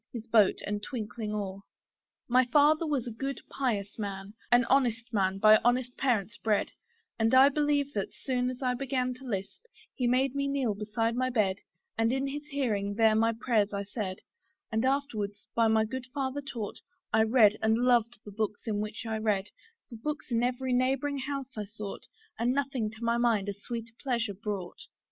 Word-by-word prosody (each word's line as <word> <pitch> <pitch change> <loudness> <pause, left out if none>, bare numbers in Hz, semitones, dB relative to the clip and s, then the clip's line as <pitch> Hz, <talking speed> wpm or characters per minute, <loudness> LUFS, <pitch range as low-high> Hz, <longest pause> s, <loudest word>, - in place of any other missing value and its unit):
his 230 -2 -6
boat 220 -4 +4
and 205 0 -2
twinkling 215 -1 -5
oar. 200 -2 -4 0.7
My 255 +1 +5
father 300 +5 +4
was 280 -5 0
a 240 - -5
good 270 +5 -4
and - - -15
pious 215 -7 -2
man, 200 -1 -5 0.2
An 245 0 +6
honest 240 -3 +1
man 195 -2 +1
by 215 +1 +7
honest 245 +1 +1
parents 230 -5 0
bred, 215 -2 0 0.5
And 225 +3 +3
I 265 +2 +8
believe 290 -1 +1
that, 200 -2 -2
soon 250 -1 -1
as 255 +1 -6
I 250 -1 +2
began 255 0 -1
To 255 +2 -13
lisp, 195 - -4 0.3
he 250 - -1
made 255 +2 +2
me 280 0 -1
kneel 275 -6 0
beside 220 +3 -1
my 255 +1 +1
bed, 205 -6 +1 0.4
And 225 +1 +3
in 270 +1 0
his 290 +2 -5
hearing 215 -9 -1
there 220 0 +5
my 225 +1 +3
prayers 220 -3 +1
I 200 0 -2
said: 200 -2 -5 0.5
And 220 +2 +1
afterwards, 225 -7 -1
by 230 -1 +3
my 220 0 +3
good 255 +3 -5
father 270 +1 -2
taught, 235 -7 -6 0.3
I - - +5
read, 220 -2 +5
and 220 0 +3
loved 240 -1 +3
the 205 - -8
books 210 0 -3
in 210 -2 -1
which 215 +2 -5
I 220 -1 -2
read; 210 -2 0 0.4
For 235 - -9
books 300 +2 -5
in 230 0 +2
every 250 +1 0
neighbouring 270 +3 +1
house 270 -1 -5
I 210 -1 -3
sought, 205 0 -8 0.3
And 240 +2 +2
nothing 270 -5 -1
to 225 +2 -11
my 235 0 +2
mind 220 -4 +2
a - - -2
sweeter 230 +3 -7
pleasure 235 -6 -1
brought. 195 -3 -5
230 Hz, 190 wpm, -29 LUFS, 210-260 Hz, 0.7 s, I